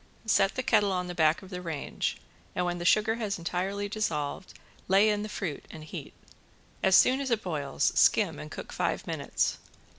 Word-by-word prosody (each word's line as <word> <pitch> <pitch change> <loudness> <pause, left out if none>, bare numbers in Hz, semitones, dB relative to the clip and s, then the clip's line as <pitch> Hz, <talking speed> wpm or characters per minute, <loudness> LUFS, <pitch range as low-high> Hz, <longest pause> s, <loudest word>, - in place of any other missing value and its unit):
Set 195 -2 +3
the 255 - -2
kettle 205 -5 +3
on 180 -1 -1
the 180 - -5
back 160 +1 +2
of 190 - -13
the 180 -1 -5
range, 160 -5 -3 0.4
and 180 - 0
when 175 0 -2
the 175 - -5
sugar 215 +5 +3
has 210 -4 -2
entirely 190 +4 -2
dissolved 190 -6 -3 0.3
lay 195 +3 +5
in 210 0 -1
the 215 - -5
fruit 175 -8 -4
and 155 - -10
heat. 155 - -8 0.7
As 190 0 +5
soon 260 +2 +5
as 270 - -2
it 230 -2 0
boils 145 -6 0
skim - - +3
and 75 +1 -8
cook - - -8
five - - -1
minutes. - - -1
190 Hz, 190 wpm, -29 LUFS, 170-210 Hz, 0.7 s, lay